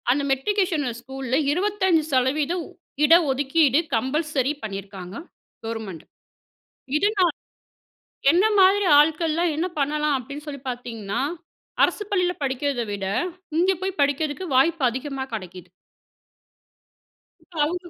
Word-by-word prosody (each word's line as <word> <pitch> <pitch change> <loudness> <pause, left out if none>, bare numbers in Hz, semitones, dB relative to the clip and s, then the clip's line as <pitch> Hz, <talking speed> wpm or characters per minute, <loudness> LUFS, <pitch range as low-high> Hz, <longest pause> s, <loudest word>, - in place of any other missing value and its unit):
அந்த 270 +4 +3
மெட்ரிகுலேஷன்ல 310 -1 0
ஸ்கூல்ல 265 0 -4 0.2
25% 320 -4 +1 0.4
இட 310 - +6 0.2
ஒதுக்கீடு 285 +1 +3 0.2
கம்பல்சரி 275 +3 0
பண்ணியிருக்காங்க 195 -3 -7 0.5
கவர்மெண்ட். 220 -7 -6 0.9
இது 400 +7 +3
நான் 350 -5 +3 1.0
என்ன 355 +4 +4 0.2
மாதிரி 385 +1 +5
ஆட்கள்லாம் 320 +2 +2
என்ன 330 +3 0
பண்ணலாம் 300 +1 +1
அப்படின்னு 280 +4 -8
சொல்லி 280 -2 -6
பார்த்தீங்கன்னா, 230 -5 -5 0.6
அரசு - - +2
பள்ளியில 360 -3 +1
படிக்கிறத 270 -1 -1
விட, 200 -1 -4 0.5
இங்க 365 +3 +4
போய் 385 0 -3
படிக்கிறதுக்கு 290 +4 0
வாய்ப்பு 320 +4 +3
அதிகமா 265 +2 -4
கிடைக்குது. 185 -3 -8 1.8
இப்போ 340 0 -15
அவுரு 350 +3 -4
290 Hz, 105 wpm, -23 LUFS, 255-335 Hz, 1.8 s, இட